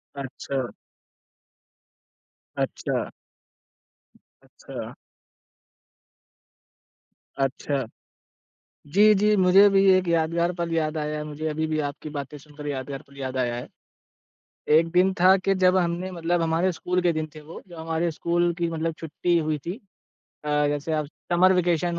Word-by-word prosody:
अच्छा। 135 -1 -4 1.8
अच्छा। - - -1 1.6
अच्छा। - - -7 2.4
अच्छा। 135 0 -1 1.1
जी, 210 +2 +7
जी 210 +2 +3
मुझे 190 +2 +7
भी 195 0 +4
एक 185 -1 +1
यादगार 170 +1 +1
पल 170 -1 -3
याद 155 -1 0
आया 150 0 -2
है। 150 - -4
मुझे 150 +1 -5
अभी 155 +1 -1
भी 155 0 -1
आपकी 150 +2 -9
बातें 145 0 -6
सुनकर 150 +1 -11
यादगार 135 0 -4
पल 140 0 -18
याद 130 -1 -4
आया 120 -2 0
है। 120 - -6 1.1
एक 165 +1 +3
दिन 185 +2 +3
था 185 +2 +7
कि 195 +1 +1
जब 185 +1 +5
हमने 175 +1 -1
मतलब 170 0 -1
हमारे 165 +3 +1
स्कूल 180 +2 -1
के 175 -2 +2
दिन 155 0 -2
थे 155 - -9
वो, 155 +3 -10
जो 175 -2 -12
हमारे 165 +1 -1
स्कूल 170 +2 0
की 170 -1 0
मतलब 165 0 -2
छुट्टी 170 +2 0
हुई 155 -1 0
थी। 175 +3 -3 0.7
अ, 150 0 +2
जैसे 145 +2 -2
अब 155 -2 0 0.3
समर 185 +2 +5
वैकैशन 175 -1 +1
165 Hz, 140 wpm, -25 LUFS, 150-175 Hz, 2.4 s, जी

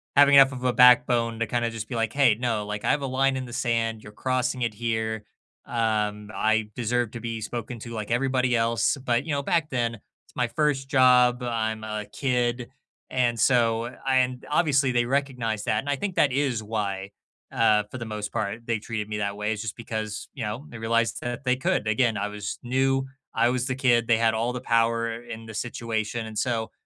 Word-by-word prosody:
having 140 0 +7
enough 135 -1 +8
of 130 -2 -7
a 125 -1 +2
backbone 120 -2 +5
to 115 - 0
kinda 120 +1 0
just 110 -1 -6
be 120 - -5
like, 115 -1 -1
"Hey, 140 -6 +4
no, 115 -3 -1
like, 105 0 -5
I - - +4
have 145 - +1
a 135 - -2
line 135 +1 +1
in 130 - -4
the 120 - -10
sand 115 -3 -1
you're 105 - -11
crossing 130 +2 -1
it 115 -3 0
here. 110 -1 -2 0.4
Um, 105 -2 -1
I 110 0 +1
deserve 120 -1 0
to 120 - -7
be 115 -1 -4
spoken 120 +2 -5
to 115 - -8
like 110 -1 -5
everybody 130 0 +1
else," 115 +4 +1
but, 125 -3 0
you 165 - -3
know, 140 -1 0
back 165 +2 0
then, 120 -3 0
it's 105 - -24
my 125 -1 +1
1st 135 +1 0
job, 125 -2 +5
I'm 110 -2 -2
a 105 -1 -4
kid, 120 +1 -1 0.4
and 120 -2 +1
so 115 -2 +3 0.2
and 130 -1 +1
obviously, 145 -4 +2
they 120 -1 +2
recognized 125 -5 -1
that 110 -2 +1
and 140 - -5
I 145 - +2
think 190 +5 -4
that 145 - +3
is 130 -4 0
why, 100 -3 -3 0.4
uh, 110 -2 +3
for - - -6
the 120 - -5
most 105 -1 -5
part, 110 +2 -3
they 115 -2 0
treated 105 -1 -4
me 105 - -3
that 100 0 -2
way, 105 +1 -1
is 105 - -5
just 110 - -5
because, 110 -3 -5
you - - -5
know, 110 +7 -4
they 115 - -9
realized 115 +1 +1
that 120 +3 -4
they 125 0 +3
could. 125 -4 0
Again, 110 0 +2
I 105 - -1
was 105 -1 -6
new. 135 +2 +1 0.3
I 115 +1 +3
was 125 0 -1
the 130 - -1
kid, 120 -3 +2
they 115 - +4
had 115 -1 +2
all 115 +2 0
the 125 - -3
power 115 -1 +1
in 115 -1 -8
the 110 - -9
situation, 115 0 -3
and 110 -1 -8
so 115 -2 -1
115 Hz, 215 wpm, -25 LUFS, 110-125 Hz, 0.4 s, enough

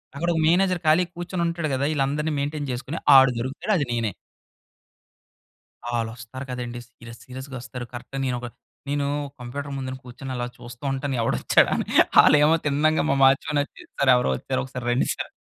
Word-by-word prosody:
అక్కడ 170 +5 -1
ఒక 160 - 0
మేనేజర్ 180 +2 +3
ఖాళీగా 170 +3 +3
కూర్చొని 175 0 -3
ఉంటాడు 170 -1 -2
గదా! 135 +2 0
ఈళ్ళందరిని 150 +2 0
మెయిన్‌టెయిన్ 145 +1 -3
చేసుకొని, 130 +6 -5 0.2
ఆడు 135 -1 +7
దొరుకుతాడు. 135 - -2
అది 145 - 0
నేనే. 115 -3 0 1.8
ఆల్లొస్తారు 120 +3 -5
కదండీ! 120 -1 -5
సీరియస్ 120 -1 -13
సీరియస్‌గా 130 +1 -8
వస్తారు. 125 -1 -7
కరెక్ట్‌గా 130 +3 -6
నేను 125 -1 -1
ఒక 120 - -5 0.4
నేను 145 0 0 0.3
కంప్యూటర్ 140 +4 -6
ముందున 130 -1 -4
కూర్చొని 130 +2 -8
అలా 120 0 -2
చూస్తా 120 +1 -12
ఉంటాను. 135 0 -2
ఎవడొచ్చాడా? 115 - +3
అని, - - -2 0.4
ఆలు - - +6
ఏమో 155 +2 +5
తిన్నంగా, 150 +2 +2
మా 135 - +3
వాచ్మాన్ 135 +2 +3
వచ్చి 145 - -8 0.2
"సర్ 140 - +3
ఎవరో 125 - +2
వచ్చారు - - -3
ఒకసారి 125 -1 -7
రండి 120 +2 +1
సార్" - - -6
135 Hz, 165 wpm, -24 LUFS, 125-150 Hz, 1.8 s, ఆడు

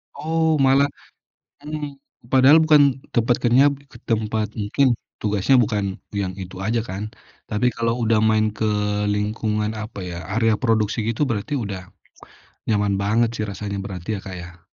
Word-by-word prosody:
Oh 160 0 +1
malah 135 +1 +5 0.8
mhm, 150 -2 -5 0.3
padahal 135 +4 +7
bukan 145 -4 +4
tempat 120 0 +3
kenyap, 135 +4 +4 0.2
ke 120 - -13
tempat 110 -1 0
mungkin 120 +5 +2 0.2
tugasnya 105 +5 +2
bukan 105 -4 0 0.2
yang 100 -2 -1
itu 95 -1 -8
aja 110 +4 0
kan. 100 +4 -5 0.4
Tapi 105 +3 +1
kalau 115 +1 -1
udah 110 -1 +3
main 110 0 +3
ke 110 - -3 0.5
lingkungan 105 +1 -1
apa 110 0 -7
ya, 85 0 -6 0.2
area 115 -1 +3
produksi 110 -2 +1
gitu 120 +6 0
berarti 110 +1 -2
udah 95 -5 -6 0.8
nyaman 105 -2 +2
banget 110 +3 +2
sih 110 - -2
rasanya 100 0 -5
berarti 95 0 -7
ya, - - -6
Kak, 95 - -6
ya. 85 -1 -11
110 Hz, 150 wpm, -22 LUFS, 100-130 Hz, 0.8 s, padahal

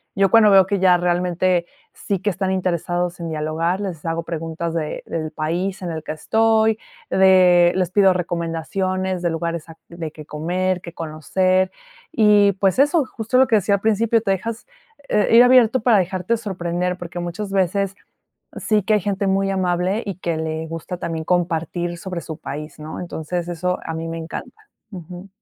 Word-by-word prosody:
yo 195 -1 +3
cuando 220 -2 +6
veo 195 -1 +7
que 200 -2 0
ya 185 -1 +5
realmente 175 0 +1 0.3
sí 200 -2 -3
que 205 - 0
están 190 0 -2
interesados 175 -1 -1
en 170 - -4
dialogar, 160 +4 -1
les 175 -6 -5
hago 165 0 -2
preguntas 165 0 -4
de 155 -2 -3
del 155 -1 -4
país 175 +6 -2
en 175 -2 -4
el 160 -1 -4
que 155 - -4
estoy, 220 +5 +2 0.3
de 180 -2 +5
les 185 -2 0
pido 195 -1 +5
recomendaciones 180 +2 -2
de 175 - 0
lugares 165 0 -3
a 165 - -12
de 170 -2 -6
qué 155 - -11
comer, 180 +5 -1
qué 170 -2 -10
conocer. 185 +4 0 0.4
Y 210 -5 +5
pues 195 +4 +1
eso, 295 +3 +4
justo 230 +1 -2
lo 260 0 +5
que 230 - +3
decía 200 0 +2
al 200 - -4
principio, 220 +1 +2
te 205 -3 0
dejas, 220 +4 -3 0.4
eh, 210 - +2
ir 235 +1 +9
abierto 250 -1 +5
para 225 -1 +4
dejarte 185 +4 0
sorprender, 180 -4 -3
porque 175 0 -7
muchas 175 +4 -5
veces, 195 +1 0 0.6
sí 210 -2 +1
que 215 - +1
hay 210 - +1
gente 200 +1 -1
muy 195 0 +1
amable 185 +2 0
y 200 -3 -4
que 170 -3 -2
le 160 0 -3
gusta 165 +2 -6
también 165 -2 -4
compartir 175 0 -1
sobre 180 0 -5
su 160 -2 -7
país, 150 -1 -7
¿no?, 155 +1 -7
entonces 175 0 -4
eso 180 +1 -2
a 165 - -5
mí 165 0 -4
me 165 0 -5
encanta. 420 - -8 0.2
Ujú. 180 0 -9
180 Hz, 180 wpm, -21 LUFS, 170-195 Hz, 0.6 s, ir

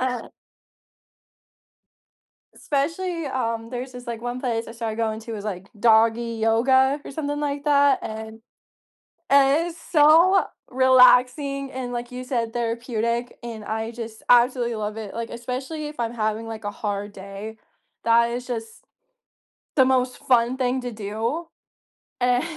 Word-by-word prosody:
Uh. 250 -2 -2 2.3
Especially, 330 +4 -2
um, 230 -3 -2
there's 255 +1 -6
just 245 0 -10
like 235 -1 -5
one 245 +1 -4
place 230 -3 -2
I - - -7
started 225 -2 -4
going 220 -1 -1
to 225 0 -6
is 205 - -7
like 190 -3 -5
doggy 230 +1 +4
yoga 260 +5 +3
or - - -7
something 290 0 -3
like 285 -1 -2
that 285 -2 +4
and 220 0 -7 0.9
and 280 +4 +5
it's 335 -1 -10
so 330 +5 +6 0.3
relaxing 260 +2 +4
and 250 -1 -5
like 240 0 -4
you 250 0 -6
said, 235 -3 -2
therapeutic, 235 0 -2
and 230 -2 -7
I 220 +1 -3
just 230 -2 -8
absolutely 240 -1 +4
love 210 0 -4
it, 215 -3 -6
like, 230 0 -4
especially 260 +6 -5
if 295 - -8
I'm 235 0 -2
having 220 0 -1
like 225 -1 -7
a 205 - -2
hard 205 0 -4
day, 200 +3 -8 0.5
that 235 0 +4
is 245 +1 -4
just 225 -3 -6 0.9
the 265 - +6
most 255 -1 +1
fun 245 0 +2
thing 255 0 0
to 245 - -5
do, 220 +9 -3 0.8
and. 245 0 +3
240 Hz, 145 wpm, -24 LUFS, 225-265 Hz, 2.3 s, so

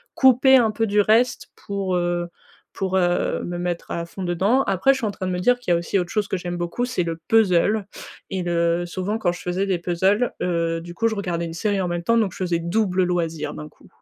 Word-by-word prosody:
couper 265 0 +6
un 230 -3 +3
peu 225 +1 0
du 205 -1 +3
reste 225 +4 +2
pour, 195 -2 -3
heu 175 0 -1 0.4
pour, 190 -1 -1
heu, 175 -1 +1
me 175 0 -4
mettre 175 -1 -4
à 170 - -3
fond 190 +3 -7
dedans. 195 +9 +2
Après, 195 +7 +3
je - - -3
suis 235 - -2
en - - -2
train 190 -1 -5
de 185 - -1
me 180 - -1
dire 245 +6 +3
qu'il 245 -7 -3
y - - +5
a - - +2
aussi 175 +3 -1
autre 175 -1 -3
chose 210 -2 0
que 190 - -2
j'aime 175 0 -5
beaucoup, 175 +8 -2
c'est 250 -7 -1
le 165 -1 -3
puzzle 210 -1 +3 0.5
et 190 - -2
le 170 0 +1
souvent 190 +4 -3
quand 175 -5 +1
je 175 - -8
faisais 180 +2 -1
des 190 -2 +1
puzzles, 190 +7 +1
heu, 165 -1 0
du 175 0 -9
coup, 230 - +1
je 225 - -1
regardais 175 -4 -2
une 165 - -6
série 200 +3 -1
en 180 - -1
même 175 0 -2
temps 230 +6 +2
donc 215 -5 +1
je - - -11
faisais 175 -2 0
double 185 +2 +1
loisir, 170 -3 -2
d'un 75 0 -8
coup. - - -22
185 Hz, 255 wpm, -22 LUFS, 175-210 Hz, 0.5 s, couper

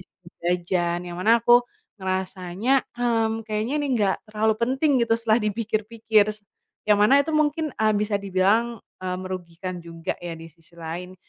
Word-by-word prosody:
jajan-jajan 175 -1 -2
yang - - -7
mana 230 +3 +4
aku 240 0 +7 0.4
ngerasanya, 190 +6 -1
"Mmm, 225 -2 0
kayaknya 215 +4 -2
ini 290 -1 -1
nggak 195 -2 +2 0.2
terlalu 220 +1 +2
penting," 265 +5 +1
gitu 230 - 0
setelah 230 -1 +2
dipikir-pikir, 220 0 +1 0.6
yang 210 - +6
mana 265 +7 +6
itu 315 - -1
mungkin, 305 +1 +1
eee, 215 0 +2
bisa 210 0 0
dibilang, 200 +4 +1 0.2
eee, 185 -1 -3
merugikan 185 -1 -6
juga 165 -1 -5
ya 175 -1 -6
di 165 0 -10
sisi 165 +2 -25
lain. 170 +2 -7
210 Hz, 150 wpm, -24 LUFS, 180-230 Hz, 0.6 s, aku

